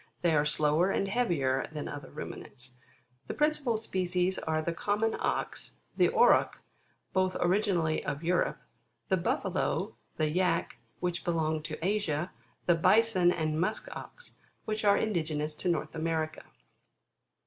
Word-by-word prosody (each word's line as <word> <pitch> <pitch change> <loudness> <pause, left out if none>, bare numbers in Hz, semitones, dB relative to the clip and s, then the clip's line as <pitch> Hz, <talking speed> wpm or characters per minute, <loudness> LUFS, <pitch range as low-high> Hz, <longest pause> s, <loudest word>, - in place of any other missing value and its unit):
They 170 -2 +4
are 145 0 +3
slower 150 +4 +2
and 195 - 0
heavier 160 - +1
than 150 -1 -5
other 145 -2 -7
Ruminants. 125 0 -8 0.5
The - - -4
principal 300 -6 +2
species 185 -3 0
are: 160 0 -1
the 165 +2 -2
common 210 +5 0
Ox, - - -2 0.2
the - - +4
Auroch, - - +4 0.6
both 185 0 +1
originally 175 -4 +1
of 145 +2 -3
Europe, 175 +1 +1 0.5
the 190 - +3
Buffalo, 185 +2 -1 0.2
the 155 -1 +1
Yack, 180 +3 0 0.2
which 175 -1 -1
belong 160 -2 0
to 155 +1 -5
Asia, 185 -5 0 0.3
the 175 - +5
Bison 185 +1 +4
and 155 -2 -1
Musk 215 +4 -2
Ox, 485 - -10 0.3
which 215 0 -2
are 200 -1 +5
indige 165 -8 -1
nous 150 +1 -2
to 180 - -2
North 155 -2 -1
America. 160 -1 -2
175 Hz, 140 wpm, -30 LUFS, 155-195 Hz, 0.6 s, the